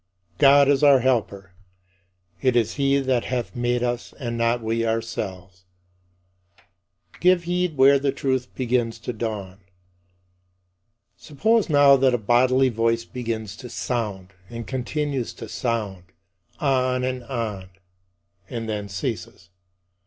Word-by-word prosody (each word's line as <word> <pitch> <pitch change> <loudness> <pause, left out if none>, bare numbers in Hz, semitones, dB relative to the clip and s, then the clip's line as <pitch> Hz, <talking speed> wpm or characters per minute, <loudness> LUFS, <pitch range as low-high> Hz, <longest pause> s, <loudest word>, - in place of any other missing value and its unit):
God 140 0 +6
is 140 0 +3
our 140 -3 +6
Helper: 100 -7 -1 0.9
"it 130 -2 +2
is 115 -3 +2
he 140 -1 +2
that 130 -3 0
hath 125 0 -3
made 120 0 0
us 120 -1 -3
and 120 -4 -4
not 115 0 0
we 115 +1 -1
ourselves." 95 -6 -4 1.5
Give 180 -1 +4
heed 175 -2 -1
where 135 +1 +6
the 140 0 0
truth 130 -2 -1
begins 120 -2 -1
to 120 +2 -6
dawn. 105 -4 -5 1.6
Suppose 220 +8 0
now 145 -2 +6
that 130 -1 +3
a - - +1
bodily 130 +4 +3
voice 115 0 0
begins 115 -5 -5
to 125 - -9
sound, 105 -8 -4 0.2
and 115 -1 -7
continues 135 0 -3
to - - -8
sound 105 -7 -3 0.5
on 130 -2 +1
and 130 -1 -3
on 110 -7 -4 0.8
and 115 -3 -5
then 105 -2 -4
ceases. 90 -2 -5
120 Hz, 125 wpm, -23 LUFS, 110-135 Hz, 1.6 s, God